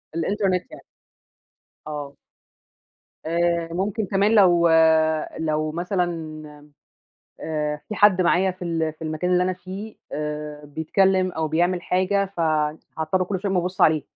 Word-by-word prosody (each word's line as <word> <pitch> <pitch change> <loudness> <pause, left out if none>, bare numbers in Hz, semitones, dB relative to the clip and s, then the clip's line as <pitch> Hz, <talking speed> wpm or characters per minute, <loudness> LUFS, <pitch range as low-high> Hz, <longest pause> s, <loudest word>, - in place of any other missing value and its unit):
الإنترنت 185 +2 0
يعني. - - -11 1.1
آه. 145 -2 -6 1.1
آآ 170 0 0
ممكن 200 +4 -1
كمان 200 +4 +2
لو 175 -4 +5 0.7
لو 155 -1 -1
مثلًا 175 +2 -1 1.3
آآ 150 -1 -2
في 215 - -4
حد 205 -3 +5
معايا 180 +2 +3
في 185 0 -8
ال 165 -2 -1
في 155 - -15
المكان 160 +3 -2
اللي 180 0 +3
أنا 185 0 0
فيه 190 +4 -8 0.2
آآ 150 0 -5
بيتكلّم 185 +5 +1
أو 160 -1 -2
بيعمل 175 +3 +1
حاجة، 190 +3 +1
ف - - -3 0.6
هاضطر 170 +4 0
كلّ 190 0 -3
شوية 195 0 -2
أقوم 180 -2 +2
أبُصّ 180 +1 -5
عليه. 155 -2 +4
175 Hz, 135 wpm, -23 LUFS, 160-190 Hz, 1.3 s, لو